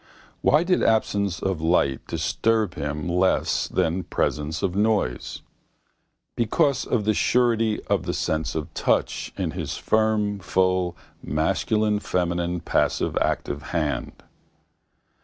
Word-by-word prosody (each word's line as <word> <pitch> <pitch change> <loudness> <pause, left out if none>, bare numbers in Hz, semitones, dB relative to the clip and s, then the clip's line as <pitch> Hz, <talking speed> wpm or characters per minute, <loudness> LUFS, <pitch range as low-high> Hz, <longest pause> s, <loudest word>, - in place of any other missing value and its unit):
Why 150 +3 +4
did 180 0 +2
absence 100 -4 +1
of 95 -5 -1
light 75 -5 +1
disturb 110 -4 0
him 75 +2 -4
less 90 +2 +1
than 85 +3 0
presence 75 0 -2
of 95 -2 0
noise? 105 - 0 0.9
Because 135 +4 +1
of 110 -4 0
the 110 - +3
surety 115 -1 +2
of - - -1
the - - 0
sense 80 0 -1
of 80 0 -4
touch - - 0
in - - -1
his - - -4
firm 110 -2 +1
full 95 -2 +1 0.2
masculine 105 - 0
feminine 90 -2 -1
passive - - 0
active 70 +1 -1 0.2
hand. 75 -3 -2
95 Hz, 120 wpm, -24 LUFS, 80-110 Hz, 0.9 s, Why